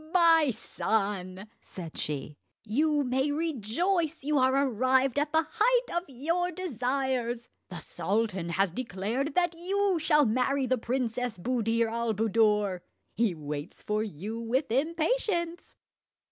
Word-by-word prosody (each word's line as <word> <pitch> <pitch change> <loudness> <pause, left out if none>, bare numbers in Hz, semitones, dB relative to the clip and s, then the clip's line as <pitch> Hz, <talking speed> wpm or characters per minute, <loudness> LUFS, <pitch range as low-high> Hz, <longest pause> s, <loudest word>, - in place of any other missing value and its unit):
"My 330 -4 +5
son," 200 -4 -2
said 170 -4 -9
she, 150 0 -4 0.2
"you 290 +6 +1
may 265 +2 0
rejoice 320 - -1
you 295 0 +2
are 260 +1 +3
arrived 260 +3 +2
at 295 0 -1
the 320 0 +3
height 475 +2 +1
of 345 +1 0
your 330 +7 -1
desires. 255 - -2 0.2
The 180 - -6
sultan 185 +2 -2
has 190 +1 +1
declared 245 - -3
that 350 -1 +2
you 380 +2 0
shall 300 -2 +4
marry 255 +4 +1
the 255 -1 +1
Princess 245 -2 -2
Buddir 230 +2 0
al 230 0 -1
Buddoor. 210 -3 +2 0.3
He 225 -6 +1
waits 150 0 -6
for 210 0 0
you 215 +2 -5
with 240 +3 -1
impatience." 340 - 0
255 Hz, 130 wpm, -29 LUFS, 215-315 Hz, 0.3 s, My